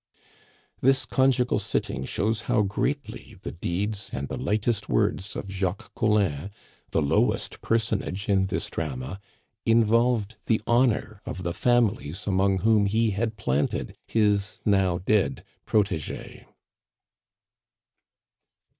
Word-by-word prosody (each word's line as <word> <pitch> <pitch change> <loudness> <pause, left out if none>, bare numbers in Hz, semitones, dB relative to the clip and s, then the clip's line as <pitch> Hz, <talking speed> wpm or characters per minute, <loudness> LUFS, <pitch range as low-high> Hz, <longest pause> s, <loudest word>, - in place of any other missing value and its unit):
This 135 +1 +3
conjugal 130 -2 +2
sitting 65 - -2
shows 110 +7 0
how 115 -4 +4
greatly 120 +3 -3
the - - -4
deeds 100 +5 -2
and 70 +1 -4
the - - -3
lightest 110 +1 -1
words 95 +1 0
of - - -5
Jacques 95 +2 -3
Collin, 100 -7 +1 0.4
the 80 - +1
lowest 70 - +1
personage 110 -3 -1
in 95 -2 +3
this - - -3
drama, 70 +3 -4 0.4
involved 115 -1 +3
the 110 - +3
honor 120 -4 +1
of 95 - -5
the 85 -1 -2
families 110 -8 +1
among 95 -1 +2
whom 110 -1 +4
he 110 +2 +2
had 110 +2 -2
planted 75 -7 -1
his 105 -2 +1
now 95 -4 +3
dead 95 +2 +1 0.2
protege. 100 -8 -1
105 Hz, 115 wpm, -26 LUFS, 95-115 Hz, 0.4 s, how